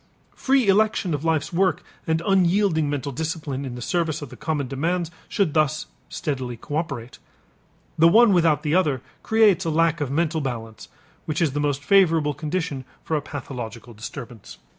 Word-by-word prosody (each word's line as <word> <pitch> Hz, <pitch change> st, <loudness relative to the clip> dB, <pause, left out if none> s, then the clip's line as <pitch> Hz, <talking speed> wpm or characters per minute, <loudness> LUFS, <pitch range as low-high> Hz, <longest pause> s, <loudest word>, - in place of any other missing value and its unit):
Free 265 Hz, -4 st, +2 dB
election 200 Hz, -3 st, +2 dB
of 145 Hz, 0 st, -2 dB
life's 160 Hz, 0 st, 0 dB
work 185 Hz, +1 st, +1 dB, 0.2 s
and 160 Hz, +1 st, 0 dB
unyielding 185 Hz, -4 st, +3 dB
mental 145 Hz, -1 st, -3 dB
discipline 150 Hz, -1 st, -3 dB
in 125 Hz, -2 st, -6 dB
the 120 Hz, -, -6 dB
service 165 Hz, -1 st, -1 dB
of 145 Hz, -, -8 dB
the -, -, -11 dB
common 150 Hz, -4 st, -2 dB
demands 165 Hz, +6 st, -1 dB, 0.2 s
should 190 Hz, -7 st, +1 dB
thus 155 Hz, -1 st, +1 dB, 0.2 s
steadily 130 Hz, -5 st, -3 dB
coöperate. 140 Hz, -4 st, -4 dB, 0.8 s
The 165 Hz, -, +7 dB
one 220 Hz, +4 st, +6 dB
without 160 Hz, -4 st, +3 dB
the 150 Hz, -1 st, 0 dB
other 150 Hz, -8 st, +2 dB, 0.2 s
creates 220 Hz, -5 st, +4 dB
a 165 Hz, -, -1 dB
lack 165 Hz, 0 st, +2 dB
of 145 Hz, -, -1 dB
mental 160 Hz, +2 st, 0 dB
balance 115 Hz, -5 st, -5 dB, 0.4 s
which 155 Hz, -1 st, -1 dB
is 165 Hz, -5 st, +2 dB
the 145 Hz, -, -1 dB
most 145 Hz, -1 st, -1 dB
favorable 165 Hz, -4 st, +4 dB
condition 150 Hz, -1 st, -3 dB, 0.2 s
for 160 Hz, -, -1 dB
a 150 Hz, -, 0 dB
pathological 120 Hz, -5 st, -7 dB
disturbance. 115 Hz, +1 st, -9 dB
155 Hz, 165 wpm, -23 LUFS, 140-170 Hz, 0.8 s, The